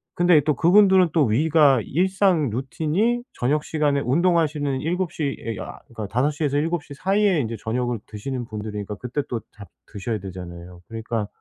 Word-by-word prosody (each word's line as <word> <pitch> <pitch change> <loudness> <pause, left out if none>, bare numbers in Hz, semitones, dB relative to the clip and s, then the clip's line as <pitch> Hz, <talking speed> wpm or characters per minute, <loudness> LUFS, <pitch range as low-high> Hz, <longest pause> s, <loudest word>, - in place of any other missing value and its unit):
근데 175 -3 +5
또 150 -1 +2
그분들은 190 +3 +5
또 155 -4 +4
위가 140 +2 +4
일상 185 - +2
루틴이 160 - -1
저녁 150 +5 0
시간에 145 -3 +1
운동하시는 150 -2 +1
7 175 +2 -1
시에 145 -5 -2 0.3
아 - - -8
그러니까 110 -3 -6
5 125 +8 +1
시에서 145 -1 -1
7 165 +1 -1
시 145 - -11
사이에 195 +1 +2
인제 115 -2 -3
저녁을 120 +2 -2
드시는 120 +4 -5
분들이니까 105 -2 -6
그때 125 +6 -3
또 120 -2 -3 0.2
다 100 - -10 0.2
드셔야 110 +1 -4
되잖아요. 90 -2 -9
그러니까 115 -1 -3
140 Hz, 355 characters per minute, -23 LUFS, 115-165 Hz, 0.3 s, 근데